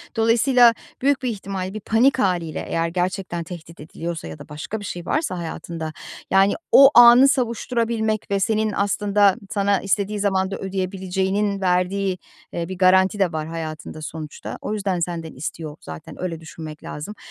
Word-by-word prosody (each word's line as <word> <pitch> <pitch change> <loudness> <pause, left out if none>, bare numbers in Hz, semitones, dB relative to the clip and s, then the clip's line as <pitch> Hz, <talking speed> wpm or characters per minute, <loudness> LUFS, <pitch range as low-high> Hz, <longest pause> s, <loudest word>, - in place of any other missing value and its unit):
Dolayısıyla 235 +1 +5 0.3
büyük 280 +1 +2
bir 250 - 0
ihtimal 195 -3 -4
bir 215 - -5
panik 235 +6 +2
hâliyle 175 -7 -1
eğer 165 0 0
gerçekten 180 0 -2
tehdit 165 -1 -10
ediliyorsa 165 - -6
ya 80 -1 -9
da - - -12
başka 150 +9 -5
bir 205 - -8
şey 175 -1 -6
varsa 295 - -1
hayatında, 165 -1 -5 0.4
yani, 195 +1 +5 0.2
o 275 0 +9
anı 240 +2 +9
savuşturabilmek 230 -5 -1
ve 200 - +2
senin 215 +1 +1
aslında 200 0 +2
sana 200 -1 +1
istediği 200 +1 -1
zamanda 195 -1 0
ödeyebileceğinin 190 +1 -2
verdiği, 185 +1 +1 0.4
eee, 170 0 -3
bir 185 - -5
garanti 190 +2 +4
de 190 -4 +2
var 155 0 -3
hayatında 155 -1 -6
sonuçta. 155 -1 -7
O 215 - -3
yüzden 195 -4 -1
senden 165 -2 -4
istiyor 150 +2 -6
zaten. 80 0 -10
Öyle 170 -3 -3
düşünmek 160 -1 -9
lazım. 155 +9 -7
190 Hz, 155 wpm, -22 LUFS, 170-210 Hz, 0.4 s, o